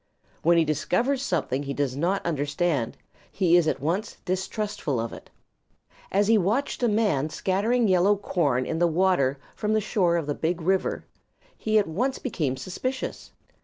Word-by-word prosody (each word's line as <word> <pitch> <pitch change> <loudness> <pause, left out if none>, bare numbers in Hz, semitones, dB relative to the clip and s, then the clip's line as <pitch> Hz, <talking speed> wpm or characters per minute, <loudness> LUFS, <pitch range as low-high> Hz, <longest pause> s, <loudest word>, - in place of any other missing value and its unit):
When 170 +1 +4
he 165 - +4
discovers 205 - 0
something 160 - -1
he 140 -1 -4
does 140 -3 -1
not 175 +7 0
understand, 145 -4 -1 0.3
he 180 -3 +3
is 175 -2 +4
at 145 - 0
once 175 - -2
distrustful 190 - -2
of 115 0 -3
it. - - -11 0.8
As 200 +1 +2
he 220 -1 +5
watched 220 +12 0
a 240 - +3
man 205 -10 +1
scattering 215 +8 +1
yellow 190 +2 +4
corn 145 -10 0
in 160 - -2
the 175 - +4
water 160 -6 +2 0.2
from 215 0 -1
the 220 - +3
shore 185 -5 +1
of 165 - -2
the 145 - -1
Big 165 +4 -1
River 185 +3 0 0.5
he 215 0 +1
at 210 - +4
once 245 +12 -1
became 150 - -2
suspicious. 255 - -4
175 Hz, 165 wpm, -26 LUFS, 150-210 Hz, 0.8 s, he